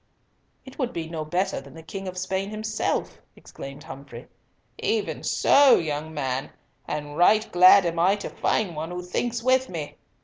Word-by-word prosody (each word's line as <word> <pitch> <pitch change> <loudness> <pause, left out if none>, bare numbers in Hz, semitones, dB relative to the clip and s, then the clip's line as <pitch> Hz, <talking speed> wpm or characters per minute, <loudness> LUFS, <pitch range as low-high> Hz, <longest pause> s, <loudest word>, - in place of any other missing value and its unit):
"It 265 +2 -13
would 255 -2 -1
be 165 -5 -4
no 160 -1 -4
better 180 +2 -1
than 140 0 -14
the 160 - -11
King 195 +4 -7
of 185 0 -6
Spain 190 +2 -2
himself," 215 0 -3
exclaimed 135 0 -10
Humfrey. 135 0 -10 0.5
"Even 430 0 -1
so, 280 -1 +5
young 155 -1 -2
man, 135 -3 -3 0.4
and 145 -1 -4
right 215 +6 +4
glad 185 +2 +7
am 170 -1 -1
I 185 +4 +4
to 205 - -6
find 190 -6 -1
one 155 +2 -4
who 180 0 -5
thinks 230 +6 -2
with 260 +1 +2
me. 160 -4 -6
180 Hz, 170 wpm, -25 LUFS, 155-215 Hz, 0.5 s, glad